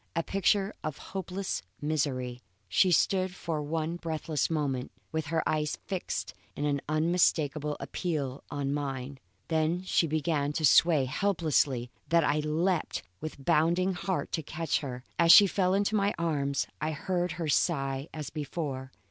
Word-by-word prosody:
A 165 - +1
picture 195 +2 +1
of 155 -2 -3 0.2
hopeless 190 0 -3 0.2
misery, 130 -5 -1 0.3
she 180 - +4
stood 185 +1 +2
for 165 -4 -3
one 160 +3 -2
breathless 160 -3 -2
moment, 140 -5 -1 0.2
with 160 -1 -2
her 160 +1 0
eyes 150 -1 0
fixed 190 -2 -3 0.2
in 145 -1 0
unmistakable 155 -2 +1
appeal 145 -7 -3
on 140 -1 -2
mine; 135 -2 -4 0.3
then 160 +2 +1
she 175 -2 +2
began 150 -1 0
to 155 +1 +1
sway 155 -1 +5
so 130 - -7
helplessly 145 -11 +1 0.2
that 165 0 +4
I 150 +1 +2
leaped 160 +3 0 0.2
with 145 -3 -7
bounding 170 +3 +3
heart 185 +1 -2
to 160 - -1
catch 160 +2 -1
her. 125 -4 -6 0.2
As 165 -1 +7
she 205 - +11
fell 190 -1 +1
into 200 +1 +1
my 200 0 +2
arms 145 -4 0 0.2
I 155 +1 -1
heard 175 +2 -1
her 165 -2 -3
sigh 135 -2 0
as 150 -3 -6
before. 140 -3 -4
155 Hz, 150 wpm, -29 LUFS, 145-175 Hz, 0.3 s, she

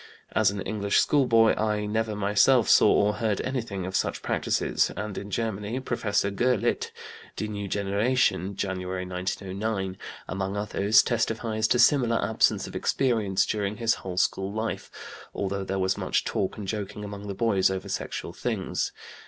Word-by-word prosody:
As 110 -3 +3
an 100 0 -4
English 100 -1 0
schoolboy 115 -6 +4
I 105 -1 0
never 110 0 -1
myself 105 +4 +4
saw - - +6
or 105 +1 +3
heard 110 -4 0
anything 115 -8 -3
of 95 0 -5
such - - -1
practices, - - +1
and 105 0 -4
in 100 - -6
Germany, 110 +2 -2
Professor 100 -6 0
Gurlitt 120 +2 +1 0.5
(Die - - -3
Neue 100 -1 -4
Generation, 100 -1 +1
January, 95 -1 -3
1909), 95 +2 -3 0.3
among 95 +1 -3
others, 105 0 +3
testifies 110 -1 0
to 125 - +2
similar 120 -3 +4
absence 110 - +2
of - - -9
experience 105 -7 +1
during 105 -1 -2
his 115 0 +2
whole 90 -2 -6
school 95 +1 +1
life, 110 +2 -3 0.5
although 100 0 -2
there 95 0 -3
was 95 0 0
much - - 0
talk 95 - -2
and 105 -2 -6
joking 105 0 -4
among 100 0 -7
the 100 - -4
boys 100 -4 +2
over 95 -1 -4
sexual - - -4
things. - - -2
105 Hz, 155 wpm, -26 LUFS, 95-110 Hz, 0.5 s, saw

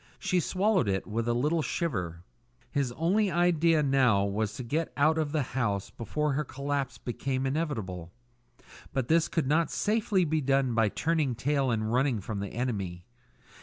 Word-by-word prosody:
She 180 - 0
swallowed 190 - +1
it 95 0 -1
with 115 +2 -2
a 120 - +2
little 150 +7 +1
shiver. 90 - -3 0.5
His 140 -4 0
only 190 - +2
idea 170 -2 +3
now 130 -8 +3
was 105 +1 -1
to 130 - -5
get 155 +7 -2
out 155 +3 +3
of 150 -2 -1
the 155 -2 +1
house 105 -7 -1
before 150 +6 -2
her 150 +3 0
collapse 140 -1 -3
became 130 +2 -3
inevitable; 110 - -3 0.8
but 130 -2 -1
this 165 0 +4
could 165 -5 -1
not 155 +3 +2
safely 210 -4 +1
be 155 0 0
done 135 -2 +2
by 115 -2 +3
turning 155 -1 0
tail 135 +2 0
and 110 -1 -1
running 130 -2 +2
from 100 +1 -5
the 100 0 -4
enemy. 100 -8 -3
135 Hz, 165 wpm, -29 LUFS, 115-160 Hz, 0.8 s, this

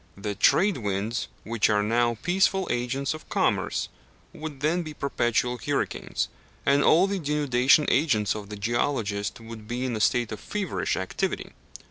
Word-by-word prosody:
The 105 +1 -3
trade 185 - +3
winds, 105 +1 -2 0.2
which 115 -1 +1
are 105 -1 +3
now 120 +2 +1
peaceful 190 +1 +2
agents 130 +4 -1
of 155 - -11
commerce, - - 0 0.5
would 150 -3 -7
then 160 +4 +1
be 155 -3 -7
perpetual 125 -3 0
hurricanes, - - -2 0.4
and 140 0 +4
all 175 +4 +6
the 200 -1 -2
denudation 145 -2 +3
agents 110 -9 +2
of 105 -2 -7
the 105 - -6
geologist 110 -2 -1
would 115 -1 -10
be 125 +2 -2
in 125 -3 -2
a - - -3
state 120 +1 +2
of 105 - -5
feverish 205 -4 -2
activity. 95 0 -3
120 Hz, 155 wpm, -26 LUFS, 110-150 Hz, 0.5 s, all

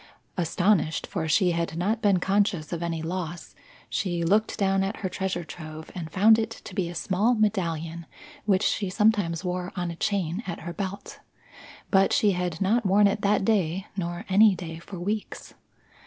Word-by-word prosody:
Astonished, 175 -1 +1
for 165 -5 -3
she 180 +3 +3
had 165 -1 -2
not 210 +6 0
been 200 -3 +3
conscious 190 -4 0
of 170 - -3
any 165 -2 -2
loss, 175 0 -5 0.3
she 175 -3 -1
looked 210 +6 +2
down 195 -2 +2
at 195 +3 -4
her - - 0
treasure 185 -1 -2
trove 155 -1 -9
and 165 -3 -6
found 220 +6 +5
it 225 0 -1
to 225 -3 -10
be 180 -3 -1
a 175 - -8
small 205 +8 +1
medallion 170 -6 -1 0.4
which 200 -1 +3
she 200 -3 0
sometimes 200 -4 +2
wore 180 0 -2
on 175 -2 -2
a - - -7
chain 185 0 -1
at 175 - -5
her 170 +1 -6
belt. 200 +1 -6 0.7
But 195 -1 +4
she 210 - +4
had 180 -3 -2
not 220 +5 +2
worn 200 +1 +4
it 200 +1 +1
that 200 -1 +2
day, 190 -3 +1
nor 175 +1 -4
any 200 +1 +6
day 165 -2 -7
for 185 +2 -9
weeks. 205 +4 -4
185 Hz, 180 wpm, -26 LUFS, 170-205 Hz, 0.7 s, any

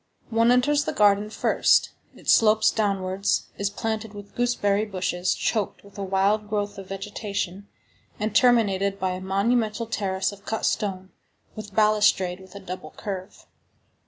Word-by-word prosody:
One 230 +1 +3
enters 290 +4 +3
the - - -2
garden 205 0 +3
first. - - +2 0.2
It - - -16
slopes 215 -1 +5
downwards, 195 -2 0 0.2
is 200 0 0
planted 220 0 -4
with 205 0 -11
gooseberry 215 -4 +1
bushes, 185 -3 -1
choked 215 -4 -2
with 200 -1 -17
a - - -2
wild 200 +2 +1
growth 205 -1 -2
of 195 - -9
vegetation, 200 -1 -5 0.5
and 215 +1 -2
terminated 200 -5 +3
by 185 0 0
a 185 0 -5
monumental 215 +4 0
terrace 190 -4 -1
of 200 0 -13
cut 220 +1 -2
stone, 190 -3 -2 0.4
with 210 -2 -9
balustrade 210 -4 +3
with 190 0 -15
a - - -6
double 185 -4 -7
curve. 195 -1 -7
205 Hz, 150 wpm, -25 LUFS, 190-215 Hz, 0.5 s, slopes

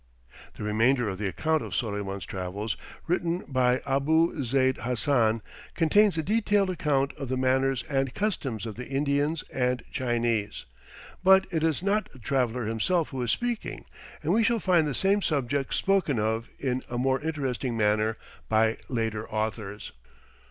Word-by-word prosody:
The - - -7
remainder 115 +4 +2
of 95 -1 -5
the 105 - -1
account 155 - 0
of - - -5
Soleyman's 100 -4 -3
travels, 95 +4 -4 0.3
written 175 +1 0
by 125 -1 +2
Abou 150 +3 +2
Zeyd 130 +1 +2
Hassan, 115 -3 +1 0.3
contains 195 +3 +4
a 160 - 0
detailed 205 0 +2
account 140 -5 0
of 135 - -5
the 130 - 0
manners 130 0 +1
and 135 -3 -1
customs 135 - -2
of 110 -2 -6
the 125 - -6
Indians 145 +3 0
and 125 -1 0
Chinese; 120 -5 -1 0.6
but 190 0 +6
it 160 -3 0
is 160 +1 +1
not 205 +2 0
the - - -15
traveller 125 0 0
himself 145 - 0
who 130 -2 -4
is 120 - -1
speaking, 240 - -2 0.4
and - - +1
we 230 - +4
shall 230 +2 +3
find 175 -6 +3
the 140 - -2
same 200 +2 +2
subjects 140 -4 0
spoken 195 -9 +2
of 110 +2 -1
in 130 -2 -1
a 120 - -3
more 130 +1 +1
interesting 135 -6 -2
manner 110 +1 +2 0.3
by 110 0 +3
later 110 -3 -2
authors. 110 -1 -3
130 Hz, 160 wpm, -27 LUFS, 115-160 Hz, 0.6 s, but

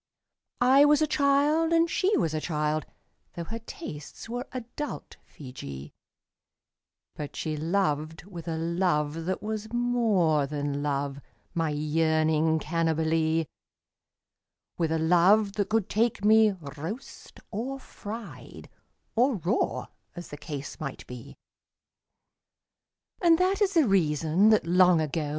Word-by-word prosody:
I 260 +3 +6
was 295 +1 +5
a 305 - -1
child, 295 +4 +3
and 335 0 +4
she 380 +5 +1
was 160 -2 0
a 155 - -2
child 150 -1 -1 0.2
— - - -45
Tho' 170 - -4
her 225 +7 -6
tastes 160 - -9
were 245 +3 -5
adult 255 +4 -6
Feejee 75 - -9 0.6
— - - -61
But 150 -1 -7
she 155 -1 -3
loved 160 -1 -1
with 175 -4 -9
a 165 -1 -2
love 165 -2 0
that 185 +1 -2
was 215 0 -4
more 220 - +2
than 145 -1 -3
love, 140 -1 -2 0.3
My 165 -3 0
yearning 155 +1 +1
Cannibalee; 160 0 0 1.3
With 165 -2 -1
a 160 - +1
love 180 +6 +4
that 205 -1 -1
could 220 -3 +1
take 220 -2 0
me 220 0 +6
roast 165 - -8
or 260 +6 -4
fried 225 -3 -9 0.5
Or 250 +2 +3
raw, 190 +4 -1 0.3
as 175 -1 -8
the 145 - -8
case 145 -1 -7
might 140 -4 -6
be. 125 +2 -10 1.9
And 335 -2 +5
that 375 +3 +1
is 395 -2 +2
the 315 -6 +5
reason 165 +1 +3
that 215 -6 +4
long 180 0 +5
ago. 155 0 -2
170 Hz, 130 wpm, -27 LUFS, 155-225 Hz, 1.9 s, I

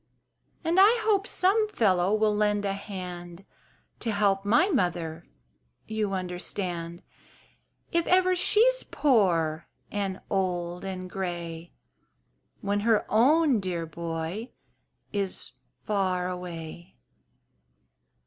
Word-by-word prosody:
"And 335 +3 +2
I 425 +5 +7
hope 405 -2 +2
some 420 +4 +2
fellow 190 - +2
will 215 0 +2
lend 210 -1 +1
a 195 - 0
hand 180 -3 -7 0.5
To 230 - -1
help 200 -2 +2
my 270 - +4
mother, 170 - -1 0.6
you 215 -2 -2
understand, 180 -1 -4 0.9
"If 340 0 +1
ever 370 0 +4
she's 470 +7 +3
poor 175 - +1 0.2
and 195 -2 -2
old 180 -2 -2
and 185 -1 -5
gray, 175 -3 -5 0.9
When 200 +1 0
her 220 0 +2
own 275 +3 +4
dear 180 -3 -3
boy 165 +7 -5 0.6
is 200 -2 -3 0.3
far 185 -4 0
away." 175 -1 -7
195 Hz, 100 wpm, -27 LUFS, 175-225 Hz, 0.9 s, I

